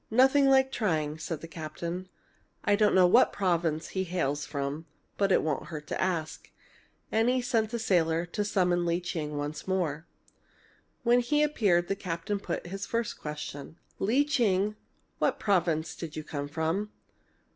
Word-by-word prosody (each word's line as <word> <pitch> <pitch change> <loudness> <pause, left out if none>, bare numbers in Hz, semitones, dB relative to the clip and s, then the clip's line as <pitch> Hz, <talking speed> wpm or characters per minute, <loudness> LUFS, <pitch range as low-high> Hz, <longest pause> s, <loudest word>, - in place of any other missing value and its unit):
"Nothing 265 +4 +5
like 265 0 +4
trying," 160 - -1
said 160 -1 -4
the 165 - -7
captain. 170 +3 -6 0.5
"I 205 -2 +3
don't 210 0 +3
know 185 -1 +7
what 175 - +5
province 170 -5 0
he 190 - -1
hails 150 -6 -1
from, 145 +2 -4 0.3
but 200 -1 +1
it - - +4
won't 150 -2 -2
hurt 155 -2 -7
to - - -2
ask." 170 -4 -2 0.6
And 225 +2 +3
he 255 +1 +2
sent 230 -3 0
a 235 - -1
sailor 170 -6 +2
to 180 +4 -2
summon 180 -4 +1
Lee 170 +1 +1
Ching 155 -4 -4
once 145 +4 -4
more. 170 -4 -1 1.0
When 240 +1 +5
he 295 +5 +2
appeared 200 -12 +2
the 195 - 0
captain 185 +2 -3
put 175 -3 -4
his 195 +3 -5
first 230 -1 -2
question: 150 0 -7 0.2
"Lee 250 +9 +3
Ching, 210 -7 +1 0.4
what - - +1
province 170 -6 +1
did 165 -2 -7
you 155 - -4
come 145 -1 -4
from?" 160 +7 -1
180 Hz, 165 wpm, -29 LUFS, 160-210 Hz, 1.0 s, know